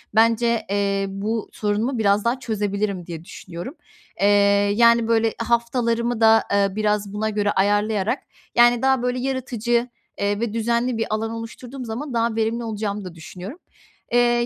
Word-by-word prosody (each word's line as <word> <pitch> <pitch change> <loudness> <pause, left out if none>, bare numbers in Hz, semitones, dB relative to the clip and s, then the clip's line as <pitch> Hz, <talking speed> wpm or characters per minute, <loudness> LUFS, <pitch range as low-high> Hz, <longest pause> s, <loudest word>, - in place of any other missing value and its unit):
bence, 230 0 +3
eee, 200 0 0
bu 210 +3 -3
sorunumu 215 +5 -1
biraz 205 -1 +2
daha 240 +3 +1
çözebilirim 205 -5 -2
diye 165 -1 -7
düşünüyorum. 175 - -8 0.5
Eee, 200 - +5 0.5
yani, 235 0 +5
böyle 225 -1 +2
haftalarımı 235 0 0
da, 225 0 +6
ııı, 200 -1 +2
biraz 210 -1 0
buna 215 +1 -1
göre 205 -1 0
ayarlayarak, 205 +4 +1 0.3
yani, 240 0 +5
daha 265 -1 +3
böyle 250 0 -1
yaratıcı, 245 -2 -1 0.3
eee, 205 0 0
ve 230 -2 -2
düzenli 235 +2 0
bir 225 - 0
alan 220 +1 -1
oluşturduğum 240 +3 -7
zaman 245 +5 -5
daha 230 -1 0
verimli 225 +1 0
olacağımı 210 -2 -3
da 180 -2 -8
düşünüyorum. 185 - -9 0.5
Eee, 240 0 +3
225 Hz, 150 wpm, -22 LUFS, 205-235 Hz, 0.5 s, da